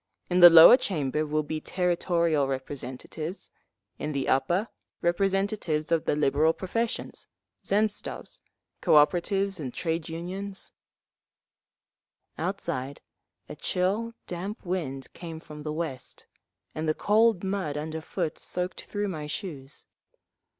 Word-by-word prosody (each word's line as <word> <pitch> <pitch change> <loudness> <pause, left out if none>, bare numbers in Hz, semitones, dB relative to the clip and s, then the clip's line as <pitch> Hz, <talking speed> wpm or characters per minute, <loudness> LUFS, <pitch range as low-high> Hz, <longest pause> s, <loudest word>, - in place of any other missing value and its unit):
In 180 - +3
the 175 -1 +12
lower 165 +8 +10
chamber 155 - -1
will 155 +1 0
be 155 +1 -4
territorial 170 -5 +1
representatives; 135 +5 -5 0.5
in 150 0 -3
the 140 -1 -2
upper, 170 - +2 0.4
representatives 190 -3 0
of 165 -2 +2
the - - +1
liberal 150 +2 +3
professions, 230 +6 -3 0.4
zemstvos, 210 +1 -2 0.4
Cooperatives—and 175 - +2
Trade 165 -1 -2
Unions…." 190 +4 -6 1.6
Outside 130 +2 -3 0.5
a - - -8
chill, 205 +6 -1
damp 190 +5 -6
wind 150 -7 -4
came 165 -3 -8
from 150 -1 -11
the 150 0 -4
west, 155 -5 -5 0.5
and 155 0 -2
the 155 - +1
cold 215 -2 +3
mud 190 -7 -2
underfoot 160 +2 -4
soaked 180 +1 -3
through 205 0 -2
my 155 -6 -5
shoes. 150 -5 -6
165 Hz, 110 wpm, -27 LUFS, 150-190 Hz, 1.6 s, the